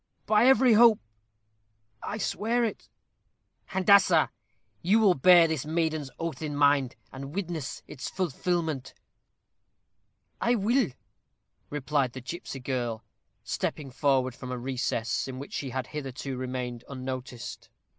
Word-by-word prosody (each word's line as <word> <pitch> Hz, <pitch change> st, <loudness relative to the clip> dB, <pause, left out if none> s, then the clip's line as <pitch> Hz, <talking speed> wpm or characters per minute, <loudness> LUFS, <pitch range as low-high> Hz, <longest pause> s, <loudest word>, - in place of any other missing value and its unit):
"By 215 Hz, +3 st, +4 dB
every 260 Hz, -2 st, +6 dB
hope, 225 Hz, 0 st, +7 dB, 1.0 s
I 210 Hz, -, -4 dB
swear 230 Hz, +3 st, 0 dB
it." 225 Hz, -, -4 dB, 0.8 s
"Handassah, 190 Hz, -4 st, +4 dB, 0.5 s
you 195 Hz, +6 st, +4 dB
will 210 Hz, -4 st, +5 dB
bear 175 Hz, +3 st, +7 dB
this 160 Hz, -4 st, -2 dB
maiden's 155 Hz, -2 st, -1 dB
oath 165 Hz, -1 st, -4 dB
in 150 Hz, -2 st, -3 dB
mind, 140 Hz, -3 st, +3 dB, 0.2 s
and 140 Hz, +3 st, -8 dB
witness 170 Hz, -8 st, -4 dB
its 130 Hz, -, -7 dB
fulfilment." 170 Hz, -4 st, -2 dB, 1.5 s
"I 240 Hz, +1 st, +3 dB
will," 235 Hz, +1 st, +2 dB, 0.8 s
replied 145 Hz, -3 st, 0 dB
the 130 Hz, -, -7 dB
gipsy 135 Hz, +1 st, -6 dB
girl, 120 Hz, -3 st, -3 dB, 0.4 s
stepping 140 Hz, -3 st, -3 dB
forward 130 Hz, -2 st, +1 dB
from 125 Hz, 0 st, -8 dB
a 125 Hz, -, -3 dB
recess, 120 Hz, -2 st, -2 dB
in 130 Hz, -1 st, -6 dB
which 140 Hz, -, -8 dB
she 135 Hz, -, -3 dB
had 130 Hz, +1 st, -3 dB
hitherto 135 Hz, -2 st, -5 dB
remained 125 Hz, -2 st, -4 dB
unnoticed. 130 Hz, -2 st, -6 dB
145 Hz, 125 wpm, -28 LUFS, 130-180 Hz, 1.5 s, hope